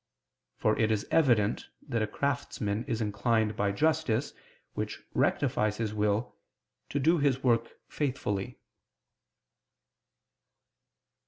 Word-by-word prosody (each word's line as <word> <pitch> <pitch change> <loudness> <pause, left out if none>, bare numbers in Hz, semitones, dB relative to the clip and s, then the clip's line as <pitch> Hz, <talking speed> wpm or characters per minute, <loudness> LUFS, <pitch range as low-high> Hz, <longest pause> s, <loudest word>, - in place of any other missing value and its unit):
For 110 - +2
it 110 - +3
is 110 -2 0
evident 120 -9 +3 0.2
that 120 -5 -1
a 110 - +1
craftsman 115 -4 -2
is 115 -4 -2
inclined 105 +1 +1
by 100 0 +1
justice, 150 0 +1 0.4
which - - -4
rectifies 105 0 +1
his 110 -2 -2
will, 105 +2 0 0.5
to - - -2
do 165 +4 +3
his 135 -2 +1
work 115 -2 +2
faithfully. 125 -6 -2
115 Hz, 105 wpm, -29 LUFS, 105-135 Hz, 0.5 s, it